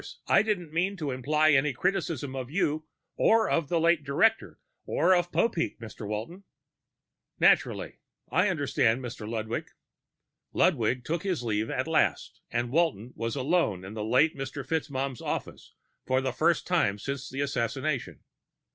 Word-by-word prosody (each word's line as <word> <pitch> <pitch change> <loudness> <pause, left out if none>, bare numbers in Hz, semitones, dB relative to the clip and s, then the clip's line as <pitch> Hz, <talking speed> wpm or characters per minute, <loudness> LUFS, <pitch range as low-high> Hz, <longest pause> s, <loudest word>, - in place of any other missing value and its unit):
I - - +5
didn't 180 -8 -2
mean 185 +4 0
to 150 -5 -3
imply 150 +5 +2
any 140 0 +3
criticism 160 -4 -1
of 130 -2 -5
you 155 -2 -1 0.3
or 225 0 +4
of 165 -4 0
the 170 - +2
late 165 -1 +3
director 215 +11 +1 0.3
or 185 - +3
of 175 -1 +1
Popeek, 220 -8 0
Mr. 110 -2 -8
Walton." 115 - -5 1.0
"Naturally. - - +2 0.3
I 180 +9 +3
understand, 135 -7 +1
Mr. 115 -3 -6
Ludwig." 110 0 -3 0.9
Ludwig 125 -6 +2
took 165 +2 -1
his 185 -10 -2
leave 110 -1 -1
at - - -1
last, - - 0
and 120 0 -2
Walton 140 -7 0
was 115 +2 -3
alone 135 - 0
in 95 - -8
the 110 -1 -4
late 130 +8 +3
Mr. 135 0 -5
FitzMaugham's 140 -5 -2
office - - -5 0.3
for 130 0 +2
the 130 -1 -2
first - - +2
time 100 0 +1
since 140 +5 -5
the 135 +2 -4
assassination. 135 - -2
140 Hz, 150 wpm, -28 LUFS, 120-165 Hz, 1.0 s, I